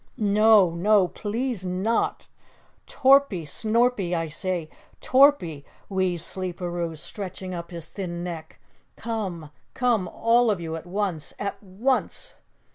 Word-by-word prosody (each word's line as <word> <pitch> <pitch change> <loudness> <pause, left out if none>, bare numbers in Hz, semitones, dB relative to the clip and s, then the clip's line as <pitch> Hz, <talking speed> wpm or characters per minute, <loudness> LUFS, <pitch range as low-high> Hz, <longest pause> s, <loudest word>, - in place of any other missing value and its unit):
"No. 210 -3 +5
No! 195 +2 +3
Please 225 0 -3
NOT! 190 +5 -1 0.6
Torpy 265 - +4
Snorpy 215 +1 +1
I 165 -1 -2
say, 175 +1 -2 0.3
Torpy," 255 - +4 0.3
wheezed 185 -4 0
Sleeperoo, 175 -3 -3
stretching 185 +2 -6
up 170 -1 -6
his 170 -2 -6
thin 175 -3 -5
neck. 165 -3 -7 0.4
"Come, 190 -9 -4 0.2
come 235 -7 +1
all 235 +5 +3
of 205 -4 +1
you 165 -1 -4
at 165 +2 -8
once. 180 -5 -3
At 200 - -4
ONCE!" 220 +7 -2
185 Hz, 120 wpm, -25 LUFS, 170-220 Hz, 0.6 s, No